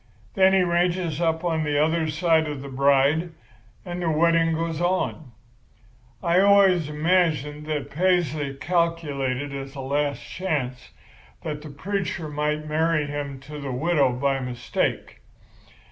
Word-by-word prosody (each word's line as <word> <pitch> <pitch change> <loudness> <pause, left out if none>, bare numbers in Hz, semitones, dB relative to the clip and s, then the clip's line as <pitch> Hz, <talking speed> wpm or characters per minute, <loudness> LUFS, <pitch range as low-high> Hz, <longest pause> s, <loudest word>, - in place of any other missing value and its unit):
Then 190 0 +4
he 190 -1 +4
ranges 175 -2 0
up 160 0 0
on 165 -3 0
the 150 -1 0
other 160 +2 +2
side 160 0 +2
of 145 -2 -5
the 140 - -7
bride, 140 +5 +2 0.5
and 175 0 -5
the 170 - 0
wedding 165 +1 +3
goes 165 0 -2
on. 175 -6 -1 0.9
I 175 0 +3
always 195 -5 +5
imagined 150 -2 0
that 150 -2 -3
Paisley 155 -5 0
calculated 145 -5 -1
as 135 0 -7
a - - -7
last 140 +1 -1
chance 135 -9 -3 0.5
that 150 -1 -4
the 155 - -9
preacher 175 +1 -3
might 150 +1 -2
marry 155 0 +1
him 145 -2 -5
to 150 +2 -9
the 140 -2 -5
widow 140 0 +2
by 135 +2 0
mistake. 125 -2 -3
155 Hz, 140 wpm, -24 LUFS, 140-170 Hz, 0.9 s, always